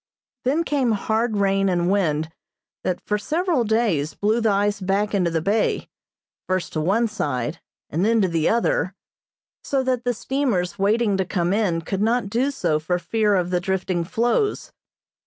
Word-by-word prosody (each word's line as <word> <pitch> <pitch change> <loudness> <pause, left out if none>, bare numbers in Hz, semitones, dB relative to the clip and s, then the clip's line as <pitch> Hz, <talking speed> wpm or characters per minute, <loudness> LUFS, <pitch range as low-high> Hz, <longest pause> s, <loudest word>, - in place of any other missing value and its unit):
Then 295 +6 +2
came 270 -7 +1
hard 220 +1 0
rain 195 -1 +2
and 175 -1 +1
wind, 160 -5 +1 0.5
that, 180 - -1
for 210 0 0
several 320 - 0
days, 210 -10 0
blew 215 +3 +1
the 220 - +2
ice 205 +1 +1
back 200 +3 0
into 185 -4 +2
the 165 -1 -1
bay, 210 +4 0 0.6
first 185 -2 -1
to 155 - -1
one 210 +9 +2
side, 145 - -3 0.3
and 165 +5 -1
then 225 +2 +3
to 190 - +3
the 165 -2 +1
other, 200 -5 +1 0.7
so 270 -1 0
that 255 -2 0
the 245 -1 0
steamers 220 -9 -1
waiting 205 0 +2
to 190 - +1
come 175 0 0
in 195 -6 +1
could 190 +4 -3
not 225 -1 +1
do 250 +5 +1
so 170 - 0
for 175 +3 -1
fear 210 +2 +1
of 180 -1 0
the 180 - +2
drifting 185 -1 -1
floes. 240 - 0
200 Hz, 175 wpm, -23 LUFS, 180-230 Hz, 0.7 s, then